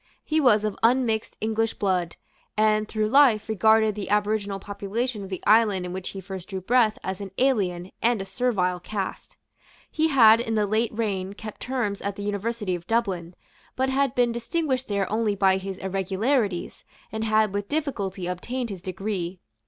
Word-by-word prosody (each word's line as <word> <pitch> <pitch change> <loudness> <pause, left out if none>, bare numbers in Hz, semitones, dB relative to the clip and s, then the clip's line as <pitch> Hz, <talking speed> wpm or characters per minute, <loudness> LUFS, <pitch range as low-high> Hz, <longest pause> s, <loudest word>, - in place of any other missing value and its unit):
He 315 0 +1
was 215 -6 +4
of 215 -2 -1
unmixed 230 -2 +1
English 225 +1 0
blood, 185 -4 0 0.4
and, 215 0 +3
through 215 -1 -1
life, 250 -5 +5
regarded 220 0 +4
the 205 -1 -6
aboriginal 205 -1 0
population 205 +4 -3
of 195 - -7
the 185 - -5
island 210 -4 +4
in 180 - -5
which 190 0 -5
he 195 - -7
first 190 -1 -8
drew 190 -2 -3
breath 225 +2 +3
as 190 +1 -4
an 200 - -5
alien 190 -9 +1
and 235 -1 +2
a 195 - -4
servile 190 -4 0
caste. 195 +1 -5 0.5
He 315 0 +2
had 230 -7 +7
in 225 -1 -2
the 210 -1 +2
late 220 +3 +1
reign 200 -4 -2
kept 215 0 -9
terms 240 -6 -2
at 200 0 -3
the 205 - -6
University 205 0 -2
of 175 -1 -5
Dublin, 190 -7 -1 0.4
but 265 +1 +1
had 270 -1 +1
been 245 -1 +3
distinguished 260 +2 -2
there 200 -2 0
only 215 -1 +1
by 190 -1 +3
his 190 0 -5
irregularities, 195 +2 -1 0.3
and 220 0 -3
had 215 -2 +2
with 205 0 -3
difficulty 205 - -2
obtained 230 +7 -3
his 190 -3 -7
degree. 185 -1 -4
210 Hz, 175 wpm, -25 LUFS, 190-230 Hz, 0.5 s, had